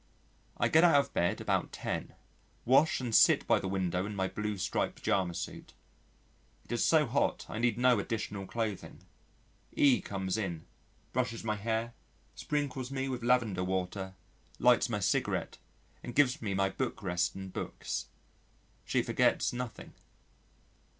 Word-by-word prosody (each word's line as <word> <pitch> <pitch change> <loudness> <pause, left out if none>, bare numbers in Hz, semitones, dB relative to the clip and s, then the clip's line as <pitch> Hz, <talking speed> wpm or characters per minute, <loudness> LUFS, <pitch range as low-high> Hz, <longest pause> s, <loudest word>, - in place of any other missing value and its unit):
I - - +2
get 160 +2 +5
out 165 -5 +7
of 140 - -2
bed 85 - +1
about - - 0
ten, - - -4 0.5
wash 135 +6 +4
and 120 -3 -3
sit - - +6
by - - +3
the - - -4
window 95 -1 -1
in 105 - -5
my 95 -1 0
blue 105 +1 -3
striped 95 - -1
pyjama 90 -3 0
suit. 85 - -6 0.9
It - - -13
is 120 - +1
so 155 -2 +4
hot 130 +2 0
I 110 - -5
need 120 -2 +1
no 125 -2 +4
additional 105 -3 -4
clothing. 110 -4 -4 0.7
E 130 -7 +4
comes 95 +1 -3
in, 85 -6 -4 0.5
brushes 120 -3 -1
my 110 -1 -1
hair, 110 +2 -2 0.4
sprinkles 140 -4 -3
me 135 0 -2
with 125 -2 -3
lavender 115 -6 +2
water, 95 +1 -3 0.4
lights - - +4
my - - -1
cigarette, - - -1 0.4
and 120 - -7
gives 145 0 +3
me 100 -4 -2
my 95 0 +2
book 125 0 -4
rest 90 -2 0
and 95 -1 -7
books. - - -4 0.8
She - - 0
forgets - - +2
nothing. 125 -2 -6
110 Hz, 150 wpm, -31 LUFS, 95-125 Hz, 0.9 s, out